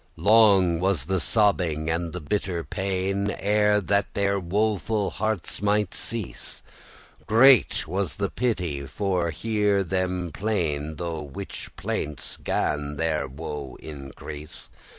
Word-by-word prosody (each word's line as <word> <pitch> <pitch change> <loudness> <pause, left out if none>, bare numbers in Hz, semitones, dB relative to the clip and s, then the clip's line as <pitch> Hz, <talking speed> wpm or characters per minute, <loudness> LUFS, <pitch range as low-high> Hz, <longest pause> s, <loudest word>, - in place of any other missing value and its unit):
Long 100 -6 +5
was 90 -7 +1
the 95 +2 0
sobbing 90 -7 +2
and 80 +1 -1
the 90 - -5
bitter 90 0 -2
pain, 95 +1 -1
Ere 105 0 +3
that 100 +2 0
their 100 0 +1
woeful 105 +3 0
heartes 110 -4 -2
mighte 105 -2 +1
cease; 115 -4 -3 0.6
Great 110 -6 +5
was 95 +1 -2
the 100 -2 -2
pity 90 - -1
for 90 -3 -1
to 80 - -7
hear 105 -2 +1
them 90 -1 -1
plain,* 80 -8 -1
*lament - - -15
Through 85 -3 -3
whiche - - -6
plaintes 75 0 -3
gan 75 0 -1
their 80 -1 0
woe 70 -1 -6
increase. 75 +1 -9
95 Hz, 130 wpm, -25 LUFS, 80-105 Hz, 0.6 s, Long